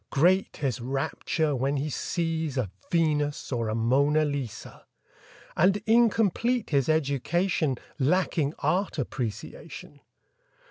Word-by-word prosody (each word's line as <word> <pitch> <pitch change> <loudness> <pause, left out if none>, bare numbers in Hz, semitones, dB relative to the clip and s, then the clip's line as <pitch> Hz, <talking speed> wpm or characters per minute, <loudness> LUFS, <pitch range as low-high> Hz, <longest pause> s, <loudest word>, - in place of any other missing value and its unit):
Great 180 +7 +2
his 130 -5 -2
rapture 140 +4 -1
when 135 +3 0
he 140 +3 -2
sees 160 -1 -2
a 110 -8 -1 0.2
Venus 150 -4 0
or 115 -3 -1
a 110 - -1
Mona 140 +7 +3
Lisa; 140 -6 -5 0.7
And 190 +2 +4
incomplete 230 0 +2
his 140 -2 +2
education 155 0 +1 0.2
Lacking 155 0 +1
Art 180 +7 0
Appreciation. 125 +2 -6
150 Hz, 105 wpm, -27 LUFS, 135-175 Hz, 0.7 s, And